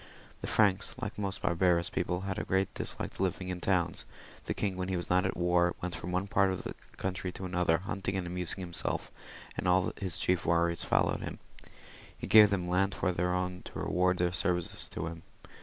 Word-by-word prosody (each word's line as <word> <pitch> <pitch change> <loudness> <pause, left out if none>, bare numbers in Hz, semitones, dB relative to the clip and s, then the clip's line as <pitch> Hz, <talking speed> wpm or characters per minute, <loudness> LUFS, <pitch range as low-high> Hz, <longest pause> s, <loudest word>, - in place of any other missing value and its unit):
The - - -4
Franks, 100 -3 +2
like 105 - -4
most 100 -2 -4
barbarous 85 0 +2
people, 90 -1 -1
had 95 0 -3
a - - -2
great 95 0 0
dislike - - -4
to - - -4
living 95 0 -1
in 90 -1 -3
towns; 90 -3 +1 0.4
the - - -1
king, 100 -2 -1
when 90 0 -3
he 95 -1 -1
was 85 - -4
not 90 +1 +4
at - - -3
war, 85 0 +3
went 90 -2 -3
from 90 - -5
one 90 +2 0
part 100 -1 +3
of 95 - -3
the - - -5 0.2
country 95 -1 -2
to 95 - -6
another, 90 -2 +1
huntiag 95 -1 -2
and 95 -2 -1
amusing 90 +1 -2
himself, 85 -2 -3 0.4
and - - -2 0.3
his 90 -4 -1
chief 90 -1 +2
warriors 85 0 +2
followed - - +2
him. - - -5 0.8
He - - -5
gave 105 -1 +8
them 90 -3 -1
land 95 +2 +1
for 90 - +1
their 90 0 0
own 90 0 -2
to - - -8
reward 90 0 +1
their 90 0 +1
services 90 -1 -1
to 80 - -4
him. 80 0 -6
90 Hz, 205 wpm, -31 LUFS, 90-95 Hz, 0.8 s, gave